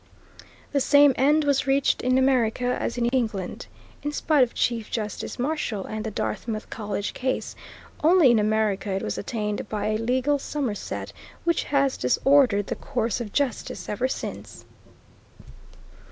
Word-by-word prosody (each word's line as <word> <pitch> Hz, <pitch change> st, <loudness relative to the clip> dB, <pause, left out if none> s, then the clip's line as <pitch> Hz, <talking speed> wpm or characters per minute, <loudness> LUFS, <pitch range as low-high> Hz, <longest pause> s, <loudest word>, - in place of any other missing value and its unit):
The 285 Hz, -, +2 dB
same 285 Hz, +1 st, +6 dB
end 295 Hz, +4 st, +3 dB
was 280 Hz, -2 st, +1 dB
reached 270 Hz, 0 st, +2 dB
in 255 Hz, +1 st, +2 dB
America 250 Hz, -2 st, +2 dB
as 235 Hz, -, -3 dB
in 240 Hz, -, +1 dB
England, 220 Hz, -8 st, -2 dB, 0.3 s
in 295 Hz, -, -2 dB
spite 295 Hz, -1 st, +2 dB
of 245 Hz, -2 st, +2 dB
Chief 230 Hz, -3 st, 0 dB
Justice 210 Hz, -2 st, -4 dB
Marshall 245 Hz, -7 st, -2 dB
and 215 Hz, 0 st, -5 dB
the 220 Hz, -, -3 dB
Dartmouth 215 Hz, +1 st, -4 dB
College 205 Hz, -2 st, -3 dB
Case, 260 Hz, 0 st, -2 dB, 0.5 s
only 325 Hz, -5 st, +6 dB
in 230 Hz, -, +4 dB
America 210 Hz, -1 st, 0 dB
it 190 Hz, -, -2 dB
was -, -, -3 dB
attained 210 Hz, -1 st, -3 dB
by 210 Hz, 0 st, -2 dB
a 215 Hz, -, +1 dB
legal 260 Hz, +5 st, +1 dB
somerset 265 Hz, -7 st, -4 dB, 0.3 s
which 340 Hz, -1 st, +1 dB
has 275 Hz, -2 st, +1 dB
disordered 230 Hz, -, +3 dB
the -, -, -3 dB
course 235 Hz, -1 st, -2 dB
of 215 Hz, -3 st, -5 dB
justice 275 Hz, -3 st, -2 dB
ever 240 Hz, +5 st, -1 dB
since. -, -, -6 dB
245 Hz, 150 wpm, -25 LUFS, 215-275 Hz, 0.5 s, same